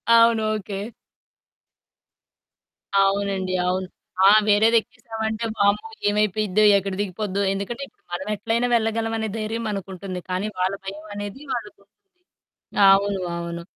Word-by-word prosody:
అవును. 230 -1 +5
ఓకే. 200 -1 -5 2.3
అవునండి 195 -1 0
అవును. 185 +1 -1 0.4
ఆ! - - +9 0.2
వేరేదెక్కేసామంటే 220 +1 +1
వామ్మో! 200 - +2 0.2
ఏమైపోయిద్దో 210 0 +1
ఎక్కడ 195 0 -3
దిగిపోద్దో. 200 0 -2
ఎందుకంటే 215 +7 -4
ఇప్పుడు - - -31
మనమెట్లైనా 210 +6 -1
వెళ్ళగలమనే 225 -1 0
ధైర్యం 225 +1 -3
మనకుంటుంది. 190 -2 -5
కానీ 185 +3 -1
వాళ్ళ 185 +1 +1
భయమనేది 205 +3 -7
వాళ్ళకుంటుంది. 210 -3 -7 1.0
అవును. 195 0 +3 0.2
అవును. 170 0 -5
205 Hz, 95 wpm, -23 LUFS, 195-220 Hz, 2.3 s, ఆ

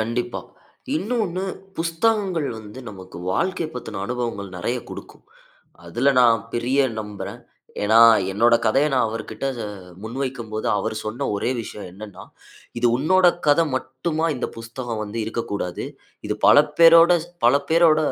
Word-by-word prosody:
கண்டிப்பா. 120 +2 -2 0.6
இன்னொன்னு 190 -1 -2 0.3
புத்தகங்கள் 170 -1 0
வந்து 110 +4 -10
நமக்கு, 95 -2 -11 0.2
வாழ்க்கை 185 - -1
பத்தின 110 -5 -6
அனுபவங்கள் 115 -6 -4
நெறய 120 +8 -1
கொடுக்கும். - - -11 0.6
அதுல 120 +11 +1
நான் 115 -2 +5
பெரிய 125 +4 +1 0.2
நம்புறேன். 105 -1 -7 0.4
ஏனா, 110 +2 +4 0.3
என்னோட 115 +4 +4
கதைய 135 +7 +3
நான் 125 -3 +3
அவர்கிட்ட 115 +4 -6 0.2
அ, - - -4 0.4
முன்வைக்கும்போது, 115 -2 -4
அவரு 100 - -3
சொன்ன 110 +3 -3
ஒரே 100 - -1
விஷய 105 -2 -8
என்னனா, 100 -1 -10 0.5
இது 120 - +2
உன்னோட 180 +7 +3 0.2
கத 145 +2 +5
மட்டுமா, 135 +5 -2
இந்த - - -2
புத்தகம் 115 0 -5
வந்து 105 +2 -6
இருக்கக்கூடாது. 100 -5 -4 0.4
இது - - -1
பல - - +8 0.2
பேரோட, 170 +1 +8 0.3
பல 120 +3 +6 0.2
பேரோட 165 -1 +5
120 Hz, 130 wpm, -22 LUFS, 110-160 Hz, 0.6 s, பல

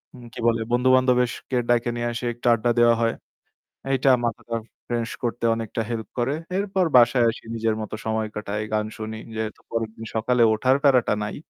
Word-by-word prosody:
উম 125 - -12
কি - - -9
বলে 115 -1 +2
বন্ধু-বান্ধবদেরকে 125 0 +2
ডাইকা 120 0 +2
নিয়ে 120 0 -2
আসি, 120 +1 -5
একটা 120 +1 -5
আড্ডা 115 +1 +1
দেওয়া 120 0 +6
হয়। 115 0 +1 0.8
এইটা 135 0 +3
মাথাটা 115 0 -3 0.3
fresh 120 -1 -2
করতে 120 0 -2
অনেকটা 115 0 -3
help 115 -2 -4
করে। 125 +4 0 0.2
এরপর 195 -2 0
বাসায় 120 0 +5
আসি, 115 - -6
নিজের 110 -1 0
মতো 110 - -5
সময় 110 0 -1
কাটাই, 105 0 -3
গান 105 0 +1
শুনি। 110 0 -6 0.2
যেহেতু 110 -1 -4
পরের 115 -1 -1
দিন 115 - -8
সকালে 120 +2 +2
ওঠার 130 +5 +2
প্যারাটা 130 -6 +4
নাই, 105 - -4
115 Hz, 175 wpm, -24 LUFS, 110-125 Hz, 0.8 s, দেওয়া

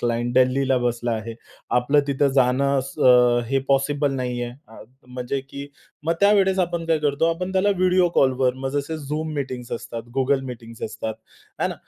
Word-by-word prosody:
Client 120 0 -1
दिल्लीला 130 +1 +3
बसला 120 -1 -1
आहे. 115 +1 -4 0.5
आपलं 145 +4 +3
तिथं 140 0 +2
जाणं 135 +2 +2
स - - -18 0.5
हे 135 - +2
पॉसिबल 140 +1 +1
नाहीये. 125 -2 -3 0.2
अ, 110 - -12 0.2
म्हणजे 125 +2 -4
की 140 +1 -9 0.4
मग 165 - +3
त्यावेळेस 195 -2 +4
आपण 170 -2 -1
काय 165 -1 +2
करतो 145 +1 0
आपण 180 +2 -5
त्याला 190 +2 +2
व्हिडिओ 185 -1 +3
कॉलवर 130 -1 +2
मग 135 0 -4
जसे 145 +3 -4 0.2
Zoom 155 0 -2
मीटिंग्ज 130 -4 -5
असतात, 115 -1 -5 0.2
Google 135 +1 +2
मीटिंग्ज 115 -2 -9
असतात, 110 0 -5 0.4
आहे - - 0
ना. - - -5
135 Hz, 165 wpm, -23 LUFS, 125-150 Hz, 0.5 s, त्यावेळेस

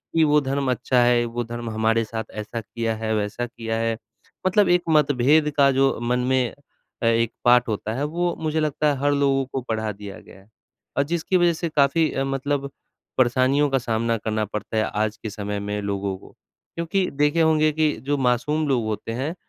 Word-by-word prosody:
कि 165 - +5
वो 150 -1 +4
धर्म 135 -1 -1
अच्छा 125 +1 +1
है, 120 0 +3
वो 120 +1 -3
धर्म 120 0 -6
हमारे 110 +1 +1
साथ 110 +1 -4
ऐसा 105 +2 -5
किया 115 +1 -3
है, 110 0 -2
वैसा 105 +3 -2
किया 115 -2 -5
है। 115 0 0 0.5
मतलब 200 +2 +3
एक 175 0 +4
मतभेद 150 0 +3
का 140 -1 +6
जो 135 0 +2
मन 120 +1 0
में 130 -2 +2 0.5
अ, - - +2
एक 115 0 +2
पाठ 125 0 +5
होता 110 0 -3
है, 135 +5 -2
वो 170 +3 -1
मुझे 160 0 -1
लगता 150 0 0
है 140 - -2
हर 145 +1 +2
लोगों 140 -1 +2
को 135 - -1
पढ़ा 110 -2 -2
दिया 100 -1 -9
गया - - -16
है 95 - -22 0.5
और 140 - +4
जिसकी 170 +4 0
वजह 175 -1 +3
से 165 +1 -3
काफ़ी 150 +2 +3
अ, 135 - -1
मतलब 140 +1 -2 0.5
परेशानियों 130 +3 +3
का 135 - +2
सामना 115 -1 0
करना 110 0 -2
पड़ता 105 +1 -5
है, 110 - +3
आज 105 0 -2
के 110 - -3
समय 105 -1 -4
में, 105 +1 -3
लोगों 100 -1 -2
को। - - -17 0.4
क्योंकि 175 +3 0
देखे 150 +3 +2
होंगे 155 -1 +3
कि 155 0 +2 0.2
जो 145 - +2
मासूम 140 +5 +1
लोग 130 -4 +1
होते 110 +1 -4
हैं, 135 +8 -3
125 Hz, 205 wpm, -23 LUFS, 110-150 Hz, 0.5 s, का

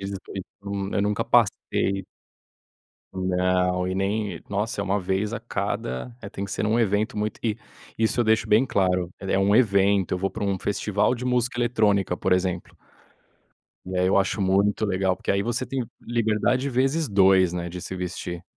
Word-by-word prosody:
eu 95 - -4 0.9
eu 100 - +2
nunca 105 0 0
passei. 95 -1 +1 1.1
Não. 90 0 +1
E 95 - -2
nem. 100 +1 -1
Nossa 105 +3 -2
é - - -1
uma 100 +1 0
vez 95 +3 -1
a 115 - -3
cada 105 - -3
é - - -7
tem 100 0 -5
que 100 - -7
ser - - -2
em - - +1
um 110 +2 +2
evento 110 +2 +1
muito 105 +1 -3
e 110 -3 0 0.4
isso 115 +2 +1
eu - - +2
deixo 110 0 +2
bem 110 +5 +4
claro, 90 -5 +1
é 95 0 -1
um 100 +2 +3
evento 100 -5 +3
eu 90 - 0
vou 95 +1 -1
para 110 - -4
um 100 -1 0
festival 105 +3 0
de 125 0 -6
música 125 -1 0
eletrônica 105 -6 +2
por - - 0
exemplo. 90 -1 +1 1.2
E 95 0 -5
aí 90 0 +2
eu 95 - +4
acho 100 +1 0
muito 100 +3 +2
legal 95 -2 +1
porque - - -3
aí 100 0 +2
você 120 +3 -1
tem 130 -1 -3 0.2
liberdade 120 +3 0
vezes 135 +4 +1
2, 95 -3 +4
né, 85 -1 -3
de 90 +1 -7
se 95 - -6
vestir. 90 -1 -5
100 Hz, 185 wpm, -25 LUFS, 95-110 Hz, 1.2 s, bem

